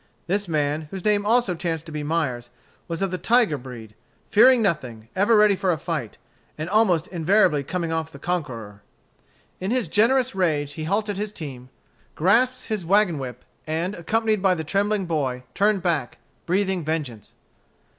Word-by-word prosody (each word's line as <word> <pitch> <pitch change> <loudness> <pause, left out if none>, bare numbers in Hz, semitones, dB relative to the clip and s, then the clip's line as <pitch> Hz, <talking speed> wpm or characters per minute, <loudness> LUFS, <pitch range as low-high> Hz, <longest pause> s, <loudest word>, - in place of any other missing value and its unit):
This 200 +2 -1
man, 150 -1 -1
whose 190 0 -7
name 205 -1 +2
also 235 -4 +3
chanced 165 -2 -3
to 160 - -9
be 150 -1 -4
Myers, 145 -6 -2 0.4
was 165 +2 -3
of 195 - -1
the 185 - -3
tiger 225 -2 +3
breed, 120 -5 -9 0.4
fearing 250 +4 +7
nothing, 125 - -2
ever 205 +4 +4
ready 210 -1 +5
for 190 0 -1
a 170 - +2
fight, 150 - -4 0.4
and 155 +1 -4
almost 185 -5 +3
invariably 175 -3 +2
coming 170 +2 -3
off 160 -3 -4
conqueror. 120 - -4 0.8
In 190 - -3
his 250 -1 0
generous 250 +4 +2
rage 155 -6 0
he 155 0 -5
halted 205 +3 -1
his 210 0 -3
team, 135 -9 -8 0.5
grasped 250 +9 +2
his 215 -5 -3
wagon 185 -3 +3
whip, 125 -2 -7 0.2
and, 165 +5 -1
accompanied 215 +3 0
by 190 -1 +3
the 160 - -4
trembling 200 +4 0
boy, 135 -7 -2
turned 200 -1 +2
back, 155 -11 -1 0.3
breathing 190 -1 0
vengeance. 145 -9 -4
175 Hz, 165 wpm, -24 LUFS, 150-205 Hz, 0.8 s, fearing